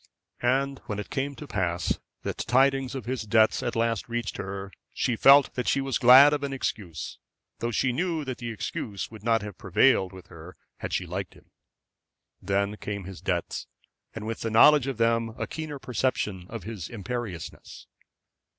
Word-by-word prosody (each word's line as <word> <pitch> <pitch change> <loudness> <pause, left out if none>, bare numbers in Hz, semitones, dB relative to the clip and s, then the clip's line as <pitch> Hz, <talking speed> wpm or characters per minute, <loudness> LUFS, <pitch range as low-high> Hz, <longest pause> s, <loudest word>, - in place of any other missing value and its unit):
And 135 +2 +1
when 105 - -3
it 105 - -6
came 140 0 -2
to 150 - -9
pass 90 - -1 0.2
that - - -4
tidings 135 +1 +2
of 130 -5 -5
his 125 0 -2
debts 110 0 +3
at 120 - -2
last 115 -1 0
reached 120 0 -3
her, 95 0 -5 0.2
she 120 - 0
felt 140 +4 +6
that 125 - -3
she - - +3
was 135 -1 -1
glad 135 +4 +9
of 145 - -1
an 140 -1 -3
excuse, 95 - -4 0.4
though 115 - -1
she 125 +3 +1
knew 165 0 -1
that 130 -2 -5
the 120 -1 -4
excuse 105 -2 -4
would 110 -2 -11
not 115 -2 +2
have 105 -3 -8
prevailed 95 0 +3
with 95 -1 -12
her 85 +2 -12 0.2
had - - -5
she 90 - -1
liked 90 +2 -5
him. - - -21 0.9
Then 100 +2 0
came 100 -2 -5
his 90 -3 -9
debts, 90 -3 -2 0.5
and 110 -2 -6
with 115 0 -4
the 115 - -1
knowledge 135 +5 +6
of 135 -4 -3
them 115 -1 +1
a - - -2
keener 155 -2 -6
perception 110 -8 -2
of 115 -4 -6
his 100 -5 -6
imperiousness. 115 -5 -6
115 Hz, 180 wpm, -27 LUFS, 100-130 Hz, 0.9 s, glad